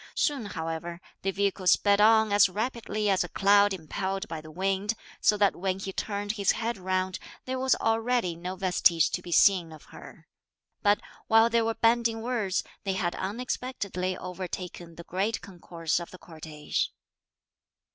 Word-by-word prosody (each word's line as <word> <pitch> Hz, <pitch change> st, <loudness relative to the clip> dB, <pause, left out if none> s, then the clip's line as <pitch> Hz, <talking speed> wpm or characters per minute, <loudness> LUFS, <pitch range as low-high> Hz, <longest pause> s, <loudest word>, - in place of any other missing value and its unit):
Soon 275 Hz, -8 st, 0 dB
however 165 Hz, -1 st, -5 dB, 0.2 s
the 195 Hz, -, -1 dB
vehicle 195 Hz, -1 st, -1 dB
sped 200 Hz, +3 st, +4 dB
on 220 Hz, 0 st, +5 dB
as 205 Hz, -1 st, +6 dB
rapidly 215 Hz, 0 st, -2 dB
as 190 Hz, -3 st, +3 dB
a 175 Hz, -, -7 dB
cloud 200 Hz, +1 st, +4 dB
impelled 190 Hz, +3 st, -3 dB
by 160 Hz, -2 st, -6 dB
the 155 Hz, -, -12 dB
wind, 195 Hz, +5 st, -1 dB, 0.3 s
so 210 Hz, -, +4 dB
that 200 Hz, -1 st, +3 dB
when 185 Hz, +1 st, -2 dB
he 195 Hz, 0 st, -6 dB
turned 205 Hz, 0 st, -2 dB
his 205 Hz, -3 st, +1 dB
head 235 Hz, +1 st, -2 dB
round, 185 Hz, 0 st, -2 dB, 0.3 s
there 260 Hz, 0 st, -3 dB
was 260 Hz, 0 st, +3 dB
already 225 Hz, -4 st, 0 dB
no 180 Hz, +3 st, -5 dB
vestige 180 Hz, -3 st, +3 dB
to 180 Hz, -, -2 dB
be 175 Hz, -, -9 dB
seen 175 Hz, -2 st, +4 dB
of 155 Hz, -3 st, -12 dB
her; -, -, -13 dB, 0.5 s
but, 205 Hz, 0 st, +3 dB, 0.3 s
while 225 Hz, +1 st, +5 dB
they 235 Hz, 0 st, +3 dB
were 225 Hz, 0 st, -1 dB
bandying 230 Hz, -1 st, +2 dB
words, 225 Hz, -6 st, -1 dB, 0.2 s
they 195 Hz, -, -1 dB
had 180 Hz, -3 st, -1 dB
unexpectedly 200 Hz, -3 st, -3 dB
overtaken 180 Hz, -2 st, -7 dB
the 170 Hz, -, -9 dB
great 195 Hz, +6 st, -1 dB
concourse 175 Hz, -3 st, -3 dB
of 170 Hz, -, -8 dB
the 185 Hz, -, -12 dB
cortege. 155 Hz, -3 st, -4 dB
195 Hz, 165 wpm, -28 LUFS, 180-220 Hz, 0.5 s, as